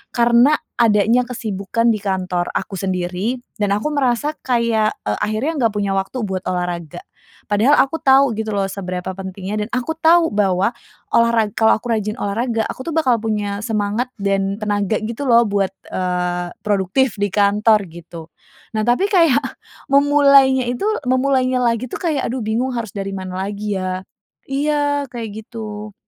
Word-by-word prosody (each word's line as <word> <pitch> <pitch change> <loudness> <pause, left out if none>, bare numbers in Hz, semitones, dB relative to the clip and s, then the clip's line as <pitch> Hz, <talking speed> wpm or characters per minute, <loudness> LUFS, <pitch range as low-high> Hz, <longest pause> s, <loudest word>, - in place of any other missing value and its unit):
Karena, 240 +4 +5 0.2
adanya 225 +1 +3
kesibukan 230 -1 -1
di 215 - -4
kantor 185 -3 -1
aku - - -4
sendiri 185 +5 -2 0.2
dan 205 - +2
aku 300 +8 -2
merasa 280 +1 +1
kayak, 230 -3 +1
eee, 105 0 -1
akhirnya 215 +8 0
nggak 225 -2 +2
punya 200 -1 0
waktu 195 +5 -2
buat 190 -2 -3
olahraga. 175 -3 -3 0.5
Padahal, 220 +8 +3
aku 295 +4 +1
tahu 270 -1 +5
gitu 220 0 -3
loh, 200 -1 0
seberapa 185 -2 -5
pentingnya, 195 +2 -5
dan 210 - -7
aku 255 +6 -1
tahu 325 -1 +4
bahwa 195 +1 +1 0.4
olahra 230 -1 +4
kalau 220 0 +4
aku 235 +1 -3
rajin 215 0 -2
olahraga, 225 +1 -1
aku - - -7
tuh - - -3
bakal 255 -8 +2
punya 205 -2 -2
semangat 215 +2 -1
dan 195 0 0
tenaga, 205 -1 0
gitu 230 +5 -4
loh, 235 0 +6
buat, 200 -2 0 0.2
eee, 180 -1 -2 0.2
produktif 205 +4 +1
di 205 - +1
kantor, 210 +1 +3
gitu. 170 0 -10 0.5
Nah, 215 - +1
tapi 245 +11 +2
kayak 330 -9 +5 0.5
memulainya 280 -2 +5
itu 250 +11 -3 0.2
memulainya 255 0 +2
lagi 235 0 +1
itu - - -5
kayak, 310 -6 0
"Aduh 255 +1 -3
bingung, 235 +4 -1
harus 225 -4 -4
dari 195 -1 -3
mana 185 -1 -5
lagi 205 0 -3
ya?" 185 0 -3 0.5
Iya, 290 0 0
kayak 230 -3 -5 0.2
gitu. 215 -2 -7
215 Hz, 155 wpm, -19 LUFS, 195-250 Hz, 0.5 s, loh